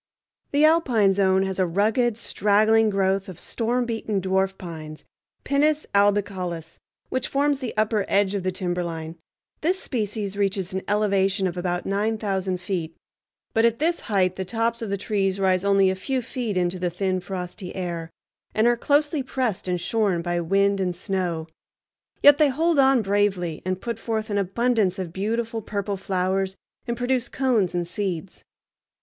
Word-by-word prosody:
The 290 +2 +4
Alpine 250 -12 +4
Zone 190 -1 +3
has 190 0 -3
a 185 - +4
rugged, 215 +6 +1
straggling 215 +1 +3
growth 195 -1 0
of 180 - -9
storm 240 +2 -1
beaten 225 -3 -2
dwarf 190 +1 0
pines 155 -3 -8 0.4
(Pinus 300 +2 +2
albicaulis), 190 -5 0 0.3
which 260 -1 -1
forms 285 0 +1
the 250 -5 -5
upper 215 -1 +2
edge 200 0 +2
of 200 - -1
the 185 +1 -1
timberline. 175 -3 -3 0.4
This 365 +5 +1
species 210 -4 -3
reaches 195 -2 -1
an 190 - -1
elevation 195 -2 +1
of 180 -2 -1
about 175 0 -2
nine 210 +3 0
thousand 190 -3 -2
feet, 175 -4 -4 0.6
but 225 - +3
at 230 0 +3
this 335 +5 +1
height 185 -3 0
the 190 - -2
tops 230 +4 -1
of 225 - -4
the 200 - -1
trees 195 -1 -1
rise 185 -1 +2
only 195 -1 +4
a - - -2
few 255 +6 -2
feet 230 -5 -3
into 180 0 0
the 180 0 0
thin 185 +1 -1
frosty 180 0 -6
air, 170 -3 -4 0.5
and 215 - +3
are 240 0 +5
closely 295 +3 +2
pressed 255 -7 -2
and 180 -1 0
shorn 190 -2 0
by 175 0 -1
wind 195 +3 +2
and 180 -2 -1
snow; 175 -3 -2 0.8
yet 290 +1 +8
they 300 -2 +5
hold 320 +3 +1
on 265 -3 +5
bravely 195 -5 0
and 185 0 -2
put 235 -2 -4
forth 220 -1 -3
an 205 - +1
abundance 200 0 +1
of 180 -3 -5
beautiful 225 +4 -2
purple 200 -1 -3
flowers 190 0 -1 0.3
and 235 0 -2
produce 245 0 0
cones 235 -10 +1
and 175 -1 -1
seeds. 185 -2 -4
200 Hz, 165 wpm, -24 LUFS, 185-230 Hz, 0.8 s, yet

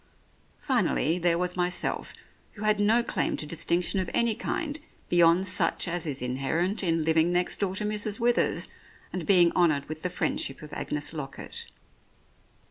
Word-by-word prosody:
Finally, 165 +4 +1
there 170 -1 +2
was 180 0 -1
myself, 180 0 -1 0.4
who 215 - -9
had 215 -1 +2
no 220 +4 +3
claim - - -1
to - - -3
distinction 170 +4 +1
of 185 - -2
any 235 -1 +3
kind 295 +6 -3 0.3
beyond 175 +2 +4
such 185 - +1
as 170 -1 -1
is 140 -3 -1
inherent 140 - -1
in 165 -3 +1
living 160 +1 +3
next 180 0 0
door 190 -2 -1
to 210 - -1
Mrs. 210 +1 -1
Withers 240 0 +1 0.5
and 180 -3 -4
being 175 -4 +6
honoured 155 -5 +2
with 155 0 -7
the 180 - -1
friendship 155 -5 -2
of 150 - -10
Agnes 150 +2 -3
Lockett. 135 -4 -7
175 Hz, 160 wpm, -27 LUFS, 160-200 Hz, 0.5 s, being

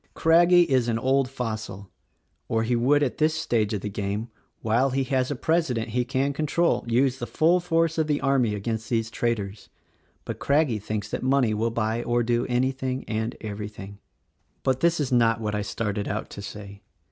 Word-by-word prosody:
Craggie 175 +2 +5
is 130 -6 +1
an 115 -1 0
old 130 +2 +1
fossil, 110 -6 -5 0.6
or 115 0 0
he 120 +2 +1
would 140 +5 +3
at 125 -6 -2
this 155 +1 +2
stage 110 -8 0
of 105 -3 -2
the 105 - -4
game, 100 +3 -3 0.3
while 115 +5 +2
he 135 +1 0
has 130 -1 0
a 145 - -2
President 140 -6 0
he 125 +2 0
can 135 +3 -1
control, 155 +4 +1
use 130 +3 +2
the - - -4
full 170 +3 +3
force 165 -2 +1
of 155 - +1
the 150 -1 +1
army 130 -6 +1
against 110 +1 -4
these 115 -1 -1
traitors. 105 -4 -3 0.6
But - - -5
Crag 150 +1 +2
gie 110 -3 -2
thinks 105 0 -4
that - - -3
money 130 -4 +2
will 110 +2 0
buy 115 0 -1
or 120 0 +1
do 120 +1 0
anything 130 +1 -1
and 110 0 -2
every 105 -1 -5
thing. 100 -1 -11 0.6
"But 130 -1 +1
this 170 +1 +2
is 140 -4 -1
not 115 -2 +3
what 105 -1 -3
I 105 - -1
started 105 0 -3
out 105 - -4
to 100 - -7
say. 100 -1 -9
120 Hz, 195 wpm, -25 LUFS, 110-135 Hz, 0.6 s, Craggie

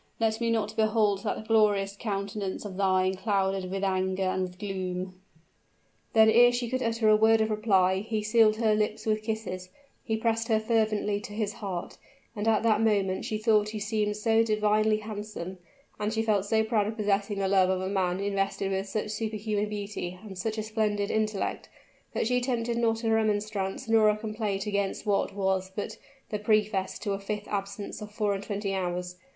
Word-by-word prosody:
let 225 0 +1
me 230 - +1
not 220 -2 0
behold 215 -2 +2
that 220 - -3
glorious 205 -3 +3
countenance 200 -1 -3
of 195 -2 -6
thine 185 -1 +2
clouded 195 -1 0
with 195 +1 -3
anger 190 0 0
and 185 0 0
with 180 -1 -4
gloom!" 185 -2 -4 0.9
Then 220 -2 +7
ere 240 +2 +7
she 240 -1 -2
could 255 0 0
utter 230 -1 +1
a 215 - +7
word 220 +1 +5
of 220 0 +1
reply, 190 -3 +3
he 215 +1 -2
sealed 215 0 +4
her 220 -1 +2
lips 210 0 -1
with 215 -1 +1
kisses 215 -5 -4 0.3
he 220 -1 -1
pressed 225 0 0
her 220 -2 +3
fervently 215 -2 +1
to 210 - -8
his 210 -1 -2
heart, 190 -5 -6 0.4
and 210 +1 -2
at 220 -1 +3
that 225 -1 +3
moment 200 -4 +1
she 220 -3 -2
thought 215 -1 +3
he 215 0 -5
seemed 210 0 -1
so 225 +1 +3
divinely 215 0 +2
handsome, 210 -4 -6 0.4
and 210 0 -1
she 225 0 0
felt 205 -3 +1
so 220 +1 +2
proud 220 -2 +1
of 220 +1 -5
possessing 205 -1 0
the 195 -1 0
love 190 -1 +4
of 190 -1 +1
a 185 - -3
man 190 -2 0
invested 195 -1 -1
with 195 +1 -2
such 210 +1 -2
superhuman 215 -1 -2
beauty 200 -3 -5
and 200 -3 -9
such 220 +4 -3
a 215 - -1
splendid 210 -2 -1
intellect, 215 -2 -1 0.5
that - - +1
she 250 +2 +2
attempted 240 -2 -1
not 225 0 +1
a 225 - +1
remonstrance 210 0 0
nor 225 -1 +5
a 210 - +1
complaint 215 -2 -3
against 200 0 -2
what 200 -1 0
was 190 -1 0
but 205 - -5 0.3
the 210 - -1
preface 210 -2 +1
to 205 -3 -2
a 195 - -3
fifth 210 +1 -4
absence 200 +1 -4
of 210 0 -7
four 210 -1 0
and 195 0 -4
twenty 200 -1 -3
hours. 180 -1 -3
210 Hz, 190 wpm, -28 LUFS, 195-220 Hz, 0.9 s, Then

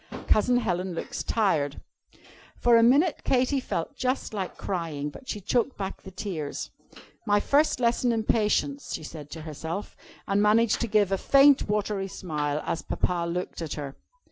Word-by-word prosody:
Cousin 245 +3 +4
Helen 185 -5 -1
looks - - -4
tired." 155 -11 0 0.8
For 240 -1 +4
a 230 - +7
minute, 280 +8 +4
Katy 260 +2 +2
felt 165 -9 -4
just 255 -2 -2
like 195 -3 -4
crying. 160 -6 -3
But 255 - -13
she 210 - -3
choked 240 +6 0
back 195 -1 -5
the 190 - -10
tears. 175 -6 -5 0.6
"My 205 0 +4
first 285 +7 +2
lesson 240 0 +2
in 225 -1 0
Patience," 230 +7 0
she 155 - -7
said 150 -1 -9
to 160 - -8
herself, 160 +5 -5 0.3
and 200 +1 +2
managed 215 +2 +3
to 235 - 0
give 205 -3 +2
a 195 - +1
faint, 275 -4 +5
watery 210 -2 -1
smile 150 -5 -3
as 165 - -2
Papa 175 -2 -1
looked 180 0 -4
at 160 -3 -3
her. 140 -2 -6
205 Hz, 170 wpm, -27 LUFS, 165-235 Hz, 0.8 s, a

